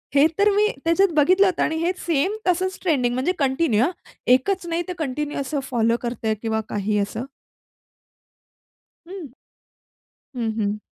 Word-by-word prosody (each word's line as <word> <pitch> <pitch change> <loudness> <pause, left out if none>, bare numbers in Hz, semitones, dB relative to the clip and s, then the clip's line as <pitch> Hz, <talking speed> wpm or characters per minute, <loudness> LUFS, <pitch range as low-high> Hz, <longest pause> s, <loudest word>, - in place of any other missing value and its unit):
हे 280 +1 +6
तर 415 +1 +5
मी 420 +1 +4 0.2
त्याच्यात 360 +3 +3
बघितलं 370 +7 +5
होत 365 - -2
आणि 320 - +1
हे 335 +2 +1
सेम 340 +5 0
तसंच 370 +1 +1
ट्रेंडिंग 265 -9 +1
म्हणजे 260 +8 0
कंटिन्यू 265 -4 +2
हा. 295 - +1 0.4
एकच 345 +10 +2
नाही 335 +1 -1
ते 360 - -3
कंटिन्यू 295 -1 -3
असं 280 +1 -2
फॉलो 230 -1 +2
करतंय 235 -2 -2
किंवा 220 -1 -1
काही 210 +1 -1
असं? 210 +4 -3 1.8
हं, 375 -2 -7 1.1
हं, 230 -2 -1
हं. 205 0 -1
290 Hz, 150 wpm, -22 LUFS, 235-360 Hz, 1.8 s, हे